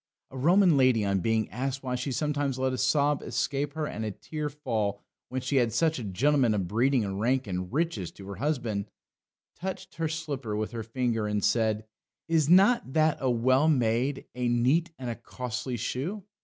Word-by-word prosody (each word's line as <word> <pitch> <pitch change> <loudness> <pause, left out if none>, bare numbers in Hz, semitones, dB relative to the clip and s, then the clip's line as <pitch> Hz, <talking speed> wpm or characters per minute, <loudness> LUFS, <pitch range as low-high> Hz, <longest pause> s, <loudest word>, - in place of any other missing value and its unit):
A 130 - -8
Roman 175 +2 +5
lady 130 -5 +4
on 100 -1 +1
being 110 +2 +1
asked 135 +3 -3
why 125 -1 -2
she 125 +2 -2
sometimes 145 -1 -1
let 130 0 0
a - - -2
sob 140 +2 +2
escape 140 0 -2
her 155 0 -2
and 110 -6 -4
a 110 - -1
tear 150 +9 -5
fall, 110 -8 -2 0.3
when 130 0 -3
she 130 +2 0
had 120 -3 +3
such 160 0 +1
a - - -5
gentleman 120 +4 +2
of 95 -4 -1
breeding 120 +4 +2
and 95 0 -4
rank 130 +4 +1
and 90 -2 -4
riches 145 - -1
to 95 - -12
her 100 - -6
husband, 120 -7 -1 0.7
touched 190 +1 -6
her 165 -1 0
slipper 145 -8 -4
with 105 0 -2
her 115 -1 -4
finger 115 -1 -1
and 105 -1 0
said: 110 0 +1 0.4
"Is 160 -3 +2
not 190 - +5
that 155 -1 +3
a 130 - +1
well 130 +5 +3
made, 125 0 +1
a 125 0 -1
neat, 130 +9 +2
and 130 - -6
a 120 - -1
costly 125 +1 -5
shoe? 175 - -3
130 Hz, 195 wpm, -28 LUFS, 110-145 Hz, 0.7 s, Roman